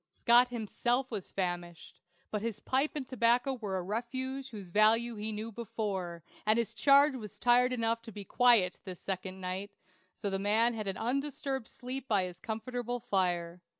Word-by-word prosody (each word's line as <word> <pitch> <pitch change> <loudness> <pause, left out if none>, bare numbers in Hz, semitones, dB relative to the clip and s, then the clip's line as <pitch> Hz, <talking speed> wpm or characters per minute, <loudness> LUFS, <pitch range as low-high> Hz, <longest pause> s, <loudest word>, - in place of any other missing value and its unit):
Scott 240 +1 +5
himself 245 +2 -1
was 205 -5 -4
famished; 175 -2 -4 0.3
but 210 - -1
his 225 -2 -3
pipe 270 +4 0
and 275 -4 -4
tobacco 245 +1 +2
were 210 -7 -3
a 185 - -3
refuge 260 +6 -3
whose 205 -6 -8
value 220 +5 +4
he 215 +1 -3
knew 215 +2 -5
before, 195 -7 -4 0.2
and 215 +1 +3
his 230 -1 0
charge 280 +4 +5
was 215 -6 -8
tired 245 +1 +4
enough 230 -2 0
to 230 -1 -10
be 205 0 -7
quiet 230 -6 +4
this 185 -3 -8
second 190 0 -4
night; 185 +2 -3 0.5
so 200 -2 -3
the 195 - -1
man 220 +4 +3
had 215 -2 -4
an 190 -1 -2
undisturbed 270 +1 -2
sleep 260 +1 -6
by 205 -5 +3
his 180 -1 -6
comfortable 245 +3 -4
fire. 180 -5 -1
225 Hz, 175 wpm, -31 LUFS, 195-245 Hz, 0.5 s, Scott